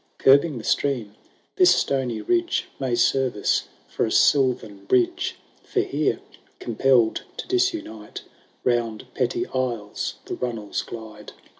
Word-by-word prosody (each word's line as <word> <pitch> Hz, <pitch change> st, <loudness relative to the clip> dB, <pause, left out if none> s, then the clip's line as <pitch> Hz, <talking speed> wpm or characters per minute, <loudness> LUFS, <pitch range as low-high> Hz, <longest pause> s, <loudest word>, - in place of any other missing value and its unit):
Curbing 140 Hz, +2 st, +5 dB
the 115 Hz, -, -7 dB
stream, 120 Hz, -7 st, 0 dB, 0.4 s
this 365 Hz, -2 st, +6 dB
stony 130 Hz, -5 st, -1 dB
ridge 350 Hz, -1 st, +1 dB
May 130 Hz, -3 st, 0 dB
serve 130 Hz, +1 st, +2 dB
us 105 Hz, -, +1 dB, 0.2 s
for -, -, -2 dB
a -, -, 0 dB
silvan 120 Hz, -8 st, +2 dB
bridge; 120 Hz, +3 st, +1 dB, 0.3 s
For -, -, 0 dB
here, -, -, -1 dB, 0.4 s
compelPd 120 Hz, -1 st, +2 dB, 0.2 s
to -, -, -6 dB
disimite. 345 Hz, -, -2 dB, 0.4 s
Round 120 Hz, -3 st, 0 dB
petty 125 Hz, -2 st, 0 dB
isles 120 Hz, -6 st, -3 dB
the -, -, -5 dB
runnels 115 Hz, -5 st, -3 dB
glide. 110 Hz, -2 st, -10 dB
125 Hz, 125 wpm, -24 LUFS, 110-135 Hz, 0.4 s, this